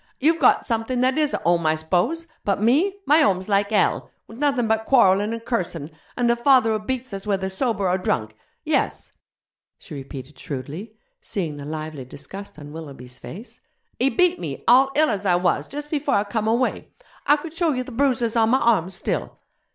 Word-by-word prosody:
'You've 320 +4 +3
got 255 - +4
something 230 +2 -1
that 260 +1 +2
is 305 -2 +1
a - - 0
home, 170 -1 +1
I 155 - +3
s'pose? 180 - 0 0.2
But 200 -1 0
me! 290 - +2
my 300 +3 +5
home's 190 - +2
like 200 -1 +2
hell, 210 -3 +1 0.2
with 225 +3 -13
nothing 275 -5 +1
but 220 0 +1
quarrellin' 205 -5 +4
and 230 0 -6
cursin', 170 - -3 0.3
and 240 -1 +3
a - - +2
father 240 -2 +4
who 215 - 0
beats 255 0 -4
us 195 +1 -6
whether 190 -2 -1
sober 200 -2 -1
or 180 +1 +1
drunk. 110 -11 -2 0.3
Yes!' - - -1 0.7
she - - -12
repeated 135 0 -9
shrewdly, 150 - -7 0.3
seeing 165 -7 -3
the 140 - -8
lively 155 -2 -5
disgust 190 +10 -9
on 145 -1 -10
Willoughby's 135 -6 -9
face, 215 +8 -10 0.4
'he 260 +3 +3
beat 360 +7 +2
me, - - -6
all 265 +3 +6
ill 310 +1 +4
as 205 -1 -2
I 180 - +4
was, 180 0 +1
jus' 290 +1 -5
before 295 -1 -1
I 200 - +3
come 215 +1 -2
away. 235 +3 0 0.4
I 290 - +6
could 315 +1 -8
show 335 -1 +1
you 255 -2 -1
the 255 - -10
bruises 240 -3 +1
on 225 -1 +3
my 260 +3 +4
arms 190 -7 +2
still. 190 - -3
220 Hz, 195 wpm, -23 LUFS, 175-260 Hz, 0.7 s, all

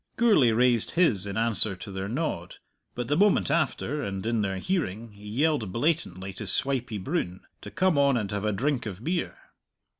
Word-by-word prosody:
Gourlay 210 - +5
raised 120 0 +3
his 110 - +3
in 100 +1 -4
answer 110 -3 +1
to 100 +2 -9
their 95 +1 -4
nod. 120 - -3 0.4
But 120 -1 -3
the 145 - +1
moment 205 +4 +3
after, 150 -2 0
and 95 -5 -4
in 115 -1 +1
their 95 -2 -2
hearing, 115 - -2
he 105 0 -12
yelled 130 - 0
blatantly 105 - -1
to - - -6
Swipey 125 -5 0
Broon 95 - -3 0.2
to - - -8
come 185 -5 +1
on 140 -2 +4
and 105 -3 -3
have 100 0 -3
a 105 - +1
drink 130 +3 -1
of 100 +2 -7
beer. 170 +3 -2
115 Hz, 185 wpm, -27 LUFS, 100-150 Hz, 0.4 s, Gourlay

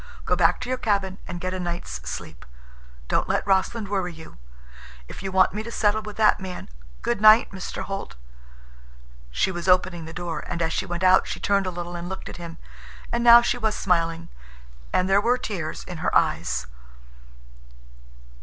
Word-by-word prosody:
Go - - +2
back - - +3
to 250 - -4
your 255 0 -1
cabin 195 -4 0
and 175 - -5
get 185 +1 -3
a 185 - -3
night's 170 - -4
sleep. - - -7 0.6
Don't - - 0
let - - 0
Rossland 200 +3 +1
worry 190 -3 -1
you. 160 0 -13 0.7
If - - -9
you 195 -1 -4
want 185 0 +4
me 210 - -3
to 225 - -7
settle 215 -1 +1
with 210 -1 -9
that 215 -1 +4
man—" 185 - -7 0.3
"Good 235 -4 -1
night, 215 +1 +7
Mr. 190 -2 -5
Holt." 195 - -6 1.1
She - - 0
was 175 0 -5
opening 180 -2 +2
the 160 - -8
door. 170 -2 -4
And 175 - -4
as 165 -1 0
she - - -2
went 175 +1 -4
out 185 0 +5
she - - -4
turned 200 -1 +1
a - - 0
little 175 0 -6
and 175 +1 -5
looked 190 - -6
at - - -9
him, 170 -1 -8 0.5
and 235 0 0
now 235 0 +9
she 245 - 0
was 220 -2 0
smiling, 165 -3 0 0.6
and 185 - +2
there 195 +1 +4
were 245 +3 +2
tears 180 -10 -5
in 180 - -8
her - - -1
eyes. 60 0 +1
185 Hz, 190 wpm, -24 LUFS, 175-210 Hz, 1.1 s, now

